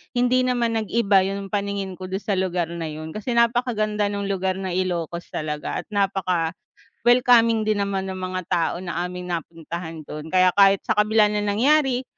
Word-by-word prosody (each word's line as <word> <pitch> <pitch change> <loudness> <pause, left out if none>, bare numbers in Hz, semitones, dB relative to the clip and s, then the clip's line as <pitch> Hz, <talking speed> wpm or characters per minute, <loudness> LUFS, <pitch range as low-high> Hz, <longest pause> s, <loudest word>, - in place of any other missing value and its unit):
hindi 250 +1 +3
naman 240 -2 0
nag-iba 205 -3 +2
yung 195 0 -4
paningin 200 -2 -2
ko 185 - -6
dun 190 - -1
sa 200 - 0
lugar 180 -3 -1
na 170 -1 -4
yun 155 +2 -8
kasi 215 +4 -4
napakaganda 230 -3 +1
nung 200 -1 -3
lugar 190 -1 -1
ng 190 -1 -3
Ilocos 175 -2 -2
talaga 150 -1 -3
at - - -46 1.0
napaka-welcoming 240 -2 +3
din 210 -1 +1
naman 195 -1 -3
ng 190 0 -5
mga 185 0 -3
tao 170 -3 +1
na 175 -1 -3
aming 180 0 -6
napuntahan 165 0 -6
dun 155 +1 -8
kaya 185 0 +5
kahit 195 -1 +6
sa - - 0
kabila 210 0 +4
ng 210 0 -1
nangyari 260 +3 +2
195 Hz, 175 wpm, -23 LUFS, 180-220 Hz, 1.0 s, kahit